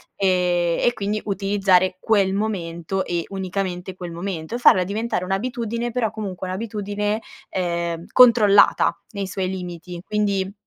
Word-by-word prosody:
ehm, 180 -3 +1
e 240 - +5
quindi 210 -1 -2
utilizzare 195 -2 +2
quel 200 -4 +2
momento 190 -3 -2
e 170 -1 -1
unicamente 190 -1 -4
quel 175 -2 -7
momento 170 +2 -5
e - - -1
farla 185 -6 +6
diventare 205 0 -2
un'abitudine 235 +4 -2
però 225 -3 0
comunque 190 -4 -5
un'abitudine, 210 +1 -2 0.3
ehm, 170 -2 -2
controllata 225 -5 +6 0.2
nei 200 -1 -3
suoi 190 0 -2
limiti. 180 -1 -6
Quindi 200 -2 -1
195 Hz, 130 wpm, -22 LUFS, 180-210 Hz, 0.3 s, farla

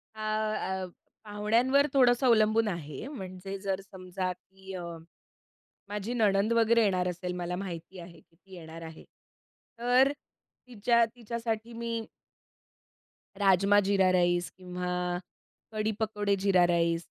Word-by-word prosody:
अ, - - -12
अ, 215 -3 -1 0.4
पाहुण्यांवर 230 +7 +2
थोडंसं 250 -1 +4
अवलंबून 220 -1 +4
आहे. 165 - -5
म्हणजे 195 -6 -7
जर 195 -1 -2
समजा 185 -1 -5
की 190 +1 -13
अ, 180 -2 -5 1.1
माझी 210 +3 -3
नणंद 210 -1 +2
वगैरे 230 0 +4
येणार 185 -3 +1
असेल, 180 +1 -4
मला 180 0 -3
माहिती 180 -1 -7
आहे 170 -1 -11
की 165 - -29
ती 190 +1 -15
येणार 165 -1 -10
आहे, 160 -1 -10 0.8
तर 250 +3 +4 0.6
तिच्या 235 0 +2
तिच्यासाठी 230 -1 -4
मी 230 -1 -3 1.3
राजमा 200 +1 +4
जीरा 195 -1 +3
राईस 175 -1 +2
किंवा 180 -1 -3 0.5
कढी 215 0 -1
पकोडे 210 -2 0
जीरा 190 -2 +4
राईस 170 -1 +1
195 Hz, 120 wpm, -29 LUFS, 180-225 Hz, 1.3 s, थोडंसं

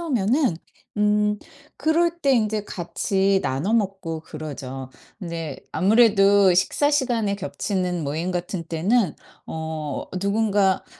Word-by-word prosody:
오면은 255 - +1 0.4
음 210 0 +2 0.4
그럴 340 +2 +1
때 275 -3 +3
인제 215 -3 +1
같이 195 +2 0
나눠 140 +10 -1
먹고 190 -7 -1
그러죠. 135 -5 -7 0.3
근데 165 -6 -5 0.2
아무래도 200 -2 +5
식사 190 +10 +2
시간에 240 -8 +1
겹치는 185 -3 -2
모임 160 +6 -2
같은 175 0 -3
때는 180 +6 +1 0.3
어 160 -2 -4 0.2
누군가 200 -2 +2
195 Hz, 230 characters per minute, -23 LUFS, 165-220 Hz, 0.4 s, 아무래도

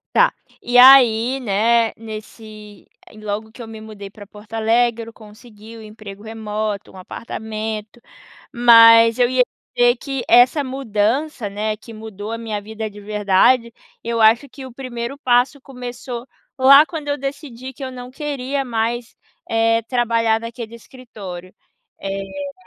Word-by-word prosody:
Tá, - - +5 0.3
e 245 0 +2
aí 250 -1 +7
né, 225 +1 +1
nesse 215 -1 -11 0.2
ai - - -17
logo 215 +1 -5
que 240 - -11
eu 225 - -10
me 220 -1 -9
mudei 210 -2 -10
pra 205 0 -14
Porto 210 +2 -14
Alegre 230 +1 +1
eu - - -11
consegui 215 0 -15
o 225 - -11
emprego 210 -2 -11
remoto, 215 -2 -5
um - - -15
apartamento, 220 +2 -7 0.5
mas 230 -1 +7
eu 245 -1 +3
ia 255 0 +3 0.3
dizer 245 0 +4
que 270 0 -5
essa 250 +4 +5
mudança, 255 0 -2
né, 215 +1 -3
que 230 +1 -14
mudou 215 -1 -8
a 230 - -4
minha 220 -3 -4
vida 220 +1 -6
de 205 - -13
verdade. 210 +4 +2 0.3
Eu 230 0 -2
acho 230 +6 +4
que 270 +1 -11
o 260 - -11
primeiro 250 +1 -6
passo, 255 +2 +1
começou 250 -1 -8 0.3
lá 275 +4 +7
quando 310 -4 -7
eu 285 - -1
decidi 265 -2 -7
que 270 - -8
eu 260 - -6
não 250 0 -9
queria 275 -1 -4
mais, 235 0 -3 0.3
eh, 225 0 +2
trabalhar 230 -2 +1
naquele 230 0 -8
escritório, 205 -7 -11 0.5
eh 195 +9 -5
230 Hz, 150 wpm, -19 LUFS, 215-250 Hz, 0.5 s, aí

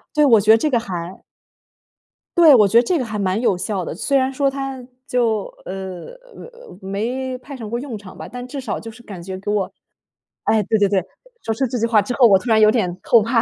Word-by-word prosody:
对， 300 0 +5
我 230 -7 +5
觉 215 - +5
得 225 - +7
这 305 +6 0
个 240 - +2
还 180 -4 -7 1.1
对， 320 -5 +8
我 210 -4 +5
觉 230 +4 +5
得 - - +2
这 355 +6 0
个 260 - -2
还 215 -2 -5
蛮 190 +1 0
有 235 -6 +2
效 190 -2 -3
的。 - - -5
虽 275 - 0
然 265 0 0
说 275 +1 +1
它 270 -1 -5 0.2
就， 230 -5 0 0.2
呃 190 -1 -7 0.3
呃， - - -13
没 245 +7 -3
派 275 +3 -10
上 225 -5 -7
过 235 +2 -2
用 260 -4 -6
场 200 -2 -13
吧， - - -8
但 245 +1 -8
至 280 +1 -6
少 260 - -4
就 225 - -9
是 235 +2 -14
感 195 -6 -9
觉 185 +1 -6
给 200 +2 -4
我 195 -2 -1 0.7
哎， 220 -1 +2
对 220 - +1
对 200 - +3
对， 195 -1 +2 0.4
说 225 - -1
出 265 +4 -1
这 245 - -3
句 230 - +1
话 220 -3 +3
之 240 +5 -4
后 250 -3 +6
我 195 -3 +5
突 245 - -6
然 220 -1 +4
有 215 0 +6
点 185 -7 -1
后 230 -2 +5
怕。 230 +2 +1
225 Hz, 265 characters per minute, -20 LUFS, 200-260 Hz, 1.1 s, 对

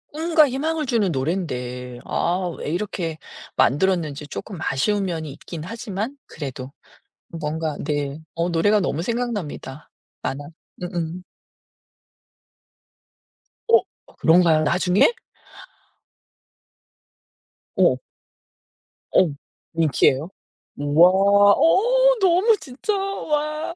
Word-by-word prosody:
꿈과 315 -1 +3
희망을 305 +4 -1
주는 220 -7 +1
노랜데 125 -5 -3
아 180 +1 -1
왜 - - -5
이렇게 170 -2 -3 0.4
만들었는지 155 -1 +1
쪼끔 195 +5 -7
아쉬운 195 +11 0
면이 160 -5 -4
있긴 160 +3 -9
하지만 220 - -5
그래도 135 -3 -7 0.6
뭔가 155 -1 -3
네. 145 0 -2
어 170 +1 -1
노래가 205 +6 +3
너무 165 -4 -1
생각납니다. 205 - -4 0.3
만화 145 +2 -4 0.4
음음. 175 -1 -4 2.5
어 460 0 +7 0.4
그런가요? 165 -1 +5
나중에? 180 - +3 2.6
어. - - +4 1.2
어. 180 - +5 0.4
밍키예요? 155 -1 +2 0.5
우와 145 +5 +5 0.4
어 - - +4
너무 385 +4 +4
진짜 275 - -4
와 310 -5 -2
180 Hz, 190 characters per minute, -22 LUFS, 150-255 Hz, 2.6 s, 어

